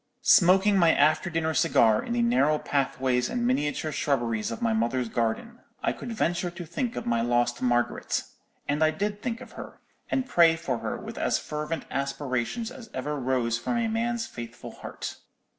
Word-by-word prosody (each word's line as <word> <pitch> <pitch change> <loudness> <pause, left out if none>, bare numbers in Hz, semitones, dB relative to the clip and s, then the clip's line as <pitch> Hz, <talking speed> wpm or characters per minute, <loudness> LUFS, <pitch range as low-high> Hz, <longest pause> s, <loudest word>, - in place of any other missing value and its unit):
"Smoking 195 +3 +5
my 170 -2 +6
after 155 +4 +3
dinner 160 -1 0
cigar 110 -7 +4
in 235 - -3
the 240 0 +2
narrow 195 - +3
pathways 130 -3 0
and 240 -1 -1
miniature 155 - 0
shrubberies 120 -7 0
of 115 - -5
my 115 -1 +1
mother's 120 +2 0
garden, 120 - -2 0.2
I - - +1
could 240 - -7
venture 175 -5 0
to 175 0 -8
think 245 - -3
of - - -4
my 120 -1 +1
lost 120 0 +1
Margaret; 120 -1 0 0.4
and 145 +2 +1
I 155 - +5
did 205 +5 -3
think 230 0 -3
of - - -11
her, - - -10 0.3
and 265 - 0
pray 170 -9 +5
for 150 -8 -3
her - - -3
with - - -8
as - - +2
fervent 150 +2 -4
aspirations 140 - -2
as 240 -5 -11
ever 145 +3 -2
rose 125 -4 0
from 240 - -1
a 230 -1 +1
man's 230 +1 -1
faithful 120 -1 -8
heart. - - -7
155 Hz, 180 wpm, -27 LUFS, -, 0.4 s, my